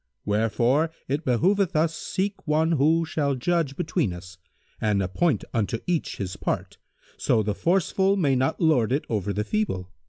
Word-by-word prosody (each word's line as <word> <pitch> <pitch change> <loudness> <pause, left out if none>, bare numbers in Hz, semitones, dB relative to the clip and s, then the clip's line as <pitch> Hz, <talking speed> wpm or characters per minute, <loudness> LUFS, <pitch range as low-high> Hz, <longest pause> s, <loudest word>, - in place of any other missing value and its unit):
Wherefore 115 +8 +2 0.2
it 145 +4 -1
behoveth 180 - +2
us 160 +1 +2
seek 195 +2 -3
one 155 +2 +2
who 160 +2 +3
shall 145 -3 -1
judge 155 +1 0
between 155 - -1
us 90 0 -11 0.4
and 105 -2 +2
appoint 105 - 0
unto 110 -1 0
each 175 -3 -1
his 95 -2 -4
part, - - -3 0.4
so 110 - +2
the 105 0 -1
force 175 - +1
full 195 +1 +2
may 145 -8 +2
not 130 +1 0
lord 135 -9 +3
it 145 +4 0
over 105 -2 -1
the 105 +1 -1
feeble." 105 - -2
140 Hz, 165 wpm, -25 LUFS, 105-165 Hz, 0.4 s, who